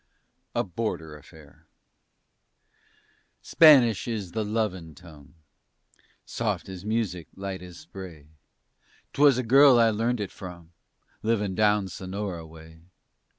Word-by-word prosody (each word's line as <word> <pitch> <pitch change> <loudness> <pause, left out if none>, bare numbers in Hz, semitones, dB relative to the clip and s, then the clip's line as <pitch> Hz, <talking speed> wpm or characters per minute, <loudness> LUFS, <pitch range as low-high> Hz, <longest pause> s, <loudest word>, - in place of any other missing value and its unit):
A - - +1
BORDER 85 -5 -5
AFFAIR 75 0 -17 1.8
Spanish 135 - +5
is 105 -7 -4
the 110 -1 -2
lovin' 100 -7 -3
tongue, 75 -2 -16 0.9
Soft - - -3
as 95 -1 -8
music, 105 -7 -2
light 95 -2 -6
as 90 -2 -11
spray. 90 -7 -11 0.9
'Twas 140 -3 +4
a 130 - -1
girl 135 +2 +6
I 115 -1 +4
learnt 115 +3 -1
it 100 -2 -4
from, 85 -3 -11 0.5
Livin' 105 -3 -1
down 105 0 +2
Sonora 95 -2 -6
way. 80 0 -15
95 Hz, 110 wpm, -26 LUFS, 85-115 Hz, 1.8 s, girl